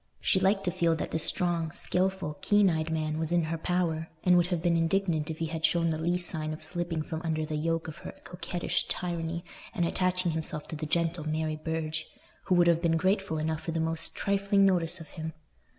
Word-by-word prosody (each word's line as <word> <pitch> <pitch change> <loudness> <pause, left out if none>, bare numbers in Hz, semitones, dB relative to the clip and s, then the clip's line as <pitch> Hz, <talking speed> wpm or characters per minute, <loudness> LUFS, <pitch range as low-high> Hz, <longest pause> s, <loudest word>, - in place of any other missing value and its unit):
She 190 - +2
liked 195 +1 +2
to 180 - 0
feel 165 -1 +2
that - - -4
this 160 - 0
strong, 170 -2 +1
skilful, 185 -2 -1
keen 205 -2 +4
eyed 160 0 -1
man 155 -1 -1
was 160 0 -1
in 175 -1 +3
her 160 +1 -2
power, 165 -2 0 0.2
and 180 -1 +5
would 175 -1 +4
have 180 -2 -1
been 170 0 +2
indignant 165 -2 +1
if 160 - -4
he 165 - -1
had 160 0 -5
shown 165 0 +3
the 155 - -2
least 175 +1 +1
sign 155 -1 -3
of 155 - -6
slipping 170 -3 -2
from 160 0 -5
under 160 -2 -1
the 155 0 -4
yoke 165 +2 -1
of 160 - -7
her - - -9
coquettish 180 0 -2
tyranny 170 -1 -2 0.3
and 175 -5 +1
attaching 185 0 +1
himself 155 -1 -2
to - - -4
the 155 0 -4
gentle 165 0 0
Mary 155 0 -1
Burge, 160 0 -3 0.4
who 185 - +3
would 175 0 +5
have 170 -1 +4
been 165 -1 +2
grateful 190 -1 +1
enough 155 0 -1
for 165 - -4
the 165 - -1
most 160 0 -1
trifling 200 0 +2
notice 175 -2 +3
from 165 - -8
him. 160 0 -6
165 Hz, 220 wpm, -29 LUFS, 160-180 Hz, 0.4 s, and